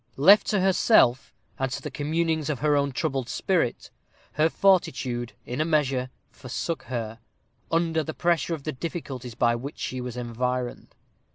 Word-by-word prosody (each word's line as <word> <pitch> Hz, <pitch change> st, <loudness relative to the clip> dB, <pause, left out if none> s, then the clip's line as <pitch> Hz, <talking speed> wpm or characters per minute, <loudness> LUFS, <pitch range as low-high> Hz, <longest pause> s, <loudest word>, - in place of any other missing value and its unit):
Left 195 Hz, +10 st, +7 dB
to 205 Hz, -3 st, +1 dB
herself, 185 Hz, -, +4 dB, 0.3 s
and 135 Hz, -1 st, -1 dB
to -, -, -3 dB
the 150 Hz, -, -7 dB
communings 160 Hz, +1 st, -1 dB
of 150 Hz, -, -1 dB
her 150 Hz, -1 st, +3 dB
own 140 Hz, -1 st, +1 dB
troubled 135 Hz, -3 st, -2 dB
spirit, 175 Hz, -11 st, -1 dB, 0.4 s
her 155 Hz, +2 st, +2 dB
fortitude, 130 Hz, -11 st, +1 dB
in 125 Hz, +5 st, -3 dB
a -, -, +4 dB
measure, 135 Hz, -5 st, +1 dB, 0.2 s
forsook 135 Hz, +4 st, -4 dB
her, 115 Hz, -3 st, -4 dB, 0.5 s
under 165 Hz, -1 st, +1 dB
the 160 Hz, 0 st, -5 dB
pressure 170 Hz, -1 st, +1 dB
of 145 Hz, -, -11 dB
the 155 Hz, -, -2 dB
difficulties 130 Hz, -5 st, -6 dB
by 120 Hz, -1 st, +2 dB
which 135 Hz, +5 st, -6 dB
she 130 Hz, -1 st, -4 dB
was 125 Hz, -1 st, -6 dB
environed. 125 Hz, +1 st, -3 dB
140 Hz, 160 wpm, -26 LUFS, 125-165 Hz, 0.5 s, Left